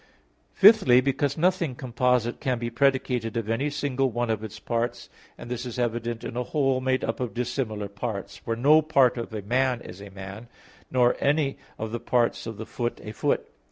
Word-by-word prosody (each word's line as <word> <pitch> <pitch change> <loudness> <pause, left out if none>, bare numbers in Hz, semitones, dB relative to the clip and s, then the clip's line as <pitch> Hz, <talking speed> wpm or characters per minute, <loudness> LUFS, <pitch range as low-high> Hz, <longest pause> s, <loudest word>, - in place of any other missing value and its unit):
Fifthly, 195 - +7
because 135 +2 0
nothing 170 -5 +1
composite 125 -1 0
can 130 -2 0
be 120 0 -4
predicated 125 -3 +1
of 115 -2 -2
any 120 +6 0
single 140 -2 0
one 120 0 -1
of 110 -1 -2
its 110 0 -7
parts. 120 +2 -3 0.3
And - - -9
this 120 0 -4
is 125 -2 -6
evident 120 -1 -2
in - - -6
a 125 - 0
whole 135 0 0
made 130 0 0
up 115 - -2
of 125 -5 -3
dissimilar 120 -4 -2
parts; 100 0 -5
for 115 - -4
no 145 +7 +5
part 140 -5 +3
of 115 - -5
a 110 -2 -5
man 125 +3 +1
is 100 -4 -11
a 100 - -9
man, 100 +4 -9 0.4
nor 125 -1 +3
any 140 -1 +1 0.2
of 110 0 -4
the 120 - -3
parts 120 -1 0
of 110 -2 -6
the 110 - -6
foot, 120 +1 -3
a 105 - -6
foot. 110 - 0
120 Hz, 195 wpm, -26 LUFS, 115-130 Hz, 0.4 s, Fifthly